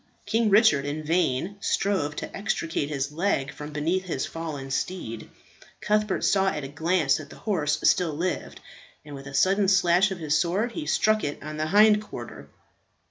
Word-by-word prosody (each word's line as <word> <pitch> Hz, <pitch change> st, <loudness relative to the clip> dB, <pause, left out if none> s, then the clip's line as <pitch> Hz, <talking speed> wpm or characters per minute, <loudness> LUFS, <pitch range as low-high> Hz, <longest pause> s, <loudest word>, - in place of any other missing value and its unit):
King 225 Hz, 0 st, +1 dB
Richard 200 Hz, -, +5 dB
in 145 Hz, +2 st, -4 dB
vain 170 Hz, +3 st, 0 dB
strove 190 Hz, -8 st, 0 dB
to -, -, -6 dB
extricate 165 Hz, -7 st, -2 dB
his 140 Hz, -1 st, -2 dB
leg 150 Hz, -5 st, -1 dB
from 150 Hz, +2 st, -8 dB
beneath 165 Hz, +6 st, -1 dB
his 150 Hz, -7 st, -2 dB
fallen 150 Hz, -5 st, -6 dB
steed. 130 Hz, -8 st, -4 dB, 0.5 s
Cuthbert 210 Hz, -1 st, 0 dB
saw 195 Hz, -1 st, +3 dB
at 150 Hz, -6 st, -1 dB
a -, -, -4 dB
glance 160 Hz, 0 st, +1 dB
that 150 Hz, -2 st, -9 dB
the -, -, -12 dB
horse 150 Hz, -8 st, 0 dB
still 175 Hz, -4 st, +3 dB
lived, 180 Hz, +4 st, -3 dB, 0.4 s
and 150 Hz, -, -10 dB
with 135 Hz, 0 st, -9 dB
a 135 Hz, -, -7 dB
sudden 195 Hz, +5 st, +3 dB
slash 190 Hz, 0 st, +4 dB
of 190 Hz, -, -5 dB
his 155 Hz, -3 st, -1 dB
sword 180 Hz, +9 st, 0 dB
he 305 Hz, +4 st, -6 dB
struck 215 Hz, -1 st, +2 dB
it 145 Hz, -1 st, -4 dB
on 155 Hz, 0 st, -6 dB
the 155 Hz, 0 st, -1 dB
hind 210 Hz, +3 st, +5 dB
quarter. 215 Hz, -, -9 dB
165 Hz, 180 wpm, -26 LUFS, 145-195 Hz, 0.5 s, Richard